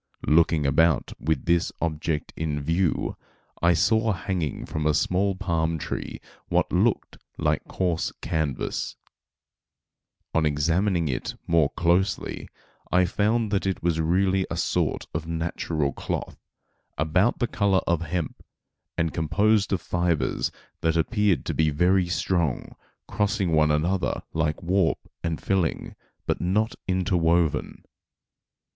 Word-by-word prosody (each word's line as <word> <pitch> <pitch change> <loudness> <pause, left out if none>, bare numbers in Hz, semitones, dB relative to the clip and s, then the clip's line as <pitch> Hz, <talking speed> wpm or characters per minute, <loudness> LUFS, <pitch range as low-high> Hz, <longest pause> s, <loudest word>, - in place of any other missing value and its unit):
Looking 80 -1 +3
about 80 +2 +2
with 80 +1 -1
this 85 0 +2
object 80 -2 -2
in 75 -2 -2
view, 80 +4 0 0.5
I 85 +1 +5
saw 110 +6 +3
hanging 85 -3 -3
from 75 0 -2
a 75 - +3
small 95 +5 +1
palm 80 -3 0
tree - - -5 0.3
what - - +1
looked - - +1 0.2
like - - 0
coarse 90 -3 -1
canvas. 75 -6 -2 1.4
On 80 - +2
examining 85 +4 +1
it 65 - -3
more 80 -4 +3
closely, 90 +3 0 0.4
I 90 0 +4
found 105 +4 +1
that 100 -2 0
it 95 - -2
was 85 -2 +1
really 95 +3 +2
a - - -3
sort - - 0
of 80 0 -3
natural 80 -3 -2
cloth, - - -4 0.6
about 90 +9 +2
the 120 - +1
color 100 -4 +2
of 85 -1 +1
hemp, 85 -1 -3 0.6
and 80 -1 0
composed 100 +5 +2
of 95 -4 0
fibres 85 -4 0 0.3
that 80 0 +1
appeared 105 +2 +1
to - - -2
be 80 -1 +2
very 90 +4 +2
strong, 85 -5 -1 0.3
crossing 105 -3 0
one 75 -1 +4
another 85 +5 0
like 80 -1 -1
warp 90 0 +2 0.3
and 85 -2 -2
filling, 95 -4 -1 0.3
but - - -1
not 105 +6 +1
interwoven. 85 -4 +1
85 Hz, 125 wpm, -25 LUFS, 80-95 Hz, 1.4 s, I